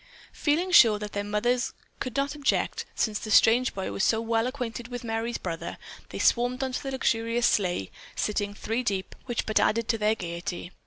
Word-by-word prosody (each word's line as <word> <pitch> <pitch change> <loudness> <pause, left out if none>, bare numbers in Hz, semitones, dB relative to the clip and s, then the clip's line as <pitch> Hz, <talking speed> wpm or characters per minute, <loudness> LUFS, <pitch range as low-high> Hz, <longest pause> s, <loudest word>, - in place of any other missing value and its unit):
Feeling 335 +5 0
sure 230 -11 +7
that 210 0 -6
their 205 - -1
mothers 235 +4 0 0.3
could 255 0 -4
not 280 +1 0
object, 290 -2 0
since 215 -2 0
the 215 - -7
strange 235 +4 +5
boy 190 -1 -3
was 195 - -1
so 220 - +3
well 225 +1 0
acquainted 245 -3 -4
with 245 -1 -6
Merry's 225 +1 -2
brother, 165 -3 -5 0.3
they - - -6
swarmed 250 +2 +2
into 260 -1 -2
the 270 - -4
luxurious 235 -2 0
sleigh, 180 - +1 0.2
sitting 205 -1 -1
three 225 +3 -2
deep, 195 -5 -2
which 240 -2 -1
but 215 - +2
added 225 +1 +2
to 225 - +1
their 215 +1 +2
gaiety. 175 -1 -5
225 Hz, 190 wpm, -27 LUFS, 210-245 Hz, 0.3 s, sure